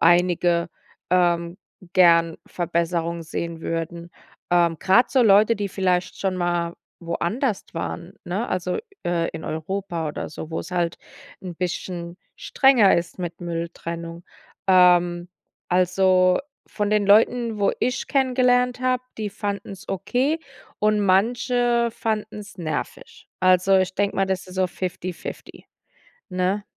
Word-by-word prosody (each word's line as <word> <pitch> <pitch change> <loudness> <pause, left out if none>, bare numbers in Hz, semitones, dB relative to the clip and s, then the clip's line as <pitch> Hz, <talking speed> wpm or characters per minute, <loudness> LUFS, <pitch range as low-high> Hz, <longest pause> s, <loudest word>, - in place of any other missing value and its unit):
einige, 175 0 +3 0.4
ähm, 175 0 +1 0.3
gern 170 -2 +5
Verbesserung 170 -1 -2
sehen 165 +1 -5
würden. 170 +1 -4 0.4
Ähm, 170 -2 +3
grad 190 +6 +4
so 260 -2 +4
Leute, 215 +1 +5
die 200 -1 -2
vielleicht 185 -2 -1
schon 190 -2 -1
mal 175 -1 -1 0.3
woanders 190 +7 -2
waren, 170 +2 -5
ne? 195 +7 -3
Also, 180 0 -2 0.3
äh, 170 -1 0
in - - -8
Europa 170 +1 -3
oder - - -5
so, 155 +1 -8
wo's 165 - -5
halt 175 -2 -1 0.5
'n 180 -2 -6
bisschen 175 -1 -4 0.2
strenger 255 -7 +4
ist 170 +2 -4
mit 175 0 -5
Mülltrennung. 170 0 -5 0.4
Ähm, 175 -1 +4 0.4
also, 185 0 +3 0.3
von 210 -1 -2
den 210 -1 +2
Leuten, 225 +2 +3
wo 200 - +2
ich 250 +1 -1
kennengelernt 250 -2 +2
habe, 255 -1 +1 0.2
die 210 -2 -3
fanden's 200 -3 -5
okay 255 - 0 0.4
und 210 0 +2
manche 235 +4 +2
fanden's 210 -2 -4
nervig. 185 - -6
Also, 185 +1 +4
ich 185 0 0
denke 200 0 0
mir, 195 0 +2
das 190 -1 -2
ist 185 - -11
so 185 0 +2
Fifty-Fifty, 185 0 -6 0.6
ne? 185 +2 -1
185 Hz, 125 wpm, -23 LUFS, 170-210 Hz, 0.6 s, gern